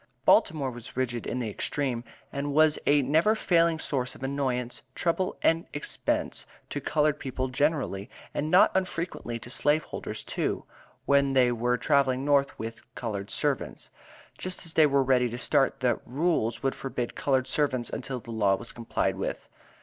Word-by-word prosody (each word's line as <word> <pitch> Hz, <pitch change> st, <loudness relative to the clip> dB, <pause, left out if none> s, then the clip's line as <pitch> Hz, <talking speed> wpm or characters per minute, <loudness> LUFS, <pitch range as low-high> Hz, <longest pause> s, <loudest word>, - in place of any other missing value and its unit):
Baltimore 140 Hz, -5 st, +4 dB
was 120 Hz, 0 st, -10 dB
rigid 120 Hz, -2 st, -1 dB
in -, -, -2 dB
the 120 Hz, -3 st, -2 dB
extreme, 125 Hz, +1 st, -2 dB, 0.3 s
and 140 Hz, +1 st, -2 dB
was 155 Hz, 0 st, +5 dB
a 145 Hz, 0 st, +5 dB
never 160 Hz, -, +3 dB
failing 170 Hz, -5 st, +3 dB
source 130 Hz, -5 st, -2 dB
of -, -, -11 dB
annoyance, 130 Hz, -3 st, -2 dB
trouble 180 Hz, +2 st, 0 dB
and 165 Hz, +1 st, +3 dB
expense 145 Hz, -, -2 dB, 0.2 s
to -, -, -3 dB
colored 150 Hz, -1 st, +1 dB
people 130 Hz, 0 st, -3 dB
generally, 130 Hz, -7 st, 0 dB, 0.2 s
and 150 Hz, -, -1 dB
not 180 Hz, +3 st, +6 dB
unfrequently 170 Hz, -9 st, -2 dB
to 120 Hz, +2 st, -9 dB
slave 150 Hz, +3 st, +2 dB
holders -, -, -6 dB
too, -, -, -2 dB, 0.4 s
when 140 Hz, -1 st, +3 dB
they 125 Hz, -2 st, +4 dB
were 120 Hz, +1 st, +1 dB
traveling 135 Hz, -2 st, +2 dB
North 140 Hz, -1 st, +2 dB
with 115 Hz, +1 st, -6 dB
"colored 100 Hz, -4 st, -4 dB
servants." -, -, -2 dB, 0.5 s
Just 185 Hz, 0 st, -4 dB
as 165 Hz, -, -5 dB
they 155 Hz, -2 st, +6 dB
were 140 Hz, -1 st, +3 dB
ready 125 Hz, -2 st, +3 dB
to 120 Hz, -, -5 dB
start, 135 Hz, +2 st, +1 dB
the 125 Hz, -2 st, +1 dB
"Rules" 130 Hz, -5 st, 0 dB
would 135 Hz, -, +1 dB
forbid 125 Hz, -3 st, -4 dB
colored 130 Hz, -2 st, +1 dB
servants 130 Hz, -3 st, 0 dB
until 130 Hz, 0 st, -4 dB
the 115 Hz, -, -10 dB
law 105 Hz, -3 st, +3 dB
was 120 Hz, +4 st, -8 dB
complied 115 Hz, -1 st, -1 dB
with. -, -, -4 dB
135 Hz, 165 wpm, -28 LUFS, 120-150 Hz, 0.5 s, not